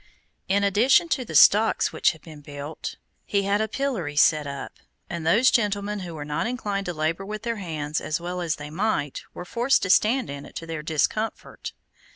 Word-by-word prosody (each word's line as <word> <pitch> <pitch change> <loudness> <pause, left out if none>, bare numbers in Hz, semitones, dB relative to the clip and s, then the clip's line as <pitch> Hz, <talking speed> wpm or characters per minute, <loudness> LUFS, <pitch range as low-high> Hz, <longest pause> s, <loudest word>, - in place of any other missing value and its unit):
In 200 +1 +2
addition 230 - +4
to 265 - 0
the 160 -9 -8
stocks 215 +8 +5
which - - +3
had 160 - -17
been 155 -3 -12
built, 145 +1 -7 0.3
he 200 -1 0
had 200 +2 +1
a 220 - 0
pillory 220 - -2
set 150 0 +4
up, 140 -1 -7 0.3
and 170 -2 -4
those 230 +10 +5
gentlemen 205 -2 0
who 175 -3 -7
were 145 -1 -6
not 150 +8 -2
inclined 205 -6 -3
to 175 - -2
labor 160 +4 -1
with 210 +2 -6
their 230 -1 -2
hands 155 -5 -3
as 155 - -2
well 180 +1 -4
as 165 -2 -1
they 150 0 -9
might, 160 -6 -1
were 180 - -7
forced 240 +8 +2
to 185 - +2
stand 240 +5 +3
in 140 0 -7
it - - -14
to 165 - -5
their 165 -2 -5
discomfort. 160 +8 -2
180 Hz, 200 wpm, -25 LUFS, 155-215 Hz, 0.3 s, stocks